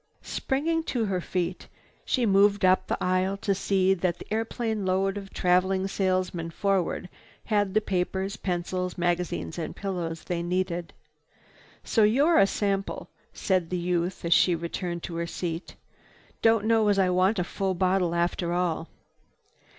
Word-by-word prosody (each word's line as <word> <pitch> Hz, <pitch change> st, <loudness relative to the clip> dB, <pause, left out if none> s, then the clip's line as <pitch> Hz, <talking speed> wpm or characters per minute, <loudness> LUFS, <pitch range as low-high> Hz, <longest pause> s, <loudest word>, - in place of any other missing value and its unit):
Springing 325 Hz, +5 st, -1 dB
to 245 Hz, -7 st, -1 dB
her 190 Hz, -3 st, -1 dB
feet, 180 Hz, 0 st, -3 dB, 0.4 s
she 250 Hz, -3 st, +1 dB
moved 200 Hz, -1 st, +4 dB
up 185 Hz, 0 st, +3 dB
the -, -, -1 dB
aisle 185 Hz, +2 st, +1 dB
to 200 Hz, 0 st, 0 dB
see 190 Hz, -1 st, +2 dB
that 180 Hz, -2 st, -1 dB
the -, -, -10 dB
airplane 225 Hz, -1 st, -2 dB
load 190 Hz, +1 st, +1 dB
of 195 Hz, -1 st, -7 dB
traveling 185 Hz, +1 st, +2 dB
salesmen 185 Hz, -3 st, -1 dB
forward 190 Hz, +1 st, -1 dB, 0.4 s
had 205 Hz, -3 st, 0 dB
the 215 Hz, -, +4 dB
papers, 190 Hz, 0 st, -2 dB
pencils, 180 Hz, 0 st, -3 dB
magazines 175 Hz, -1 st, -1 dB
and 160 Hz, -, -4 dB
pillows 175 Hz, -5 st, -4 dB
they 175 Hz, -1 st, -2 dB
needed. 175 Hz, -1 st, -2 dB, 0.9 s
"So 225 Hz, -, +1 dB
you're 275 Hz, +11 st, +4 dB
a 195 Hz, -, +6 dB
sample," 195 Hz, -1 st, -2 dB, 0.2 s
said 185 Hz, -4 st, 0 dB
the 180 Hz, -, -1 dB
youth 175 Hz, 0 st, -1 dB
as 170 Hz, -, +4 dB
she 175 Hz, +1 st, +4 dB
returned 170 Hz, +1 st, -4 dB
to 170 Hz, -2 st, -5 dB
her 170 Hz, 0 st, -2 dB
seat. 170 Hz, 0 st, -5 dB, 0.7 s
"Don't 225 Hz, -2 st, +4 dB
know 225 Hz, -1 st, +3 dB
as 205 Hz, -1 st, +3 dB
I 185 Hz, -2 st, +3 dB
want 185 Hz, +4 st, +3 dB
a 180 Hz, -, +1 dB
full 190 Hz, +1 st, -2 dB
bottle 180 Hz, -1 st, +1 dB
after 170 Hz, 0 st, 0 dB
all." 175 Hz, -2 st, -1 dB
185 Hz, 155 wpm, -27 LUFS, 175-200 Hz, 0.9 s, a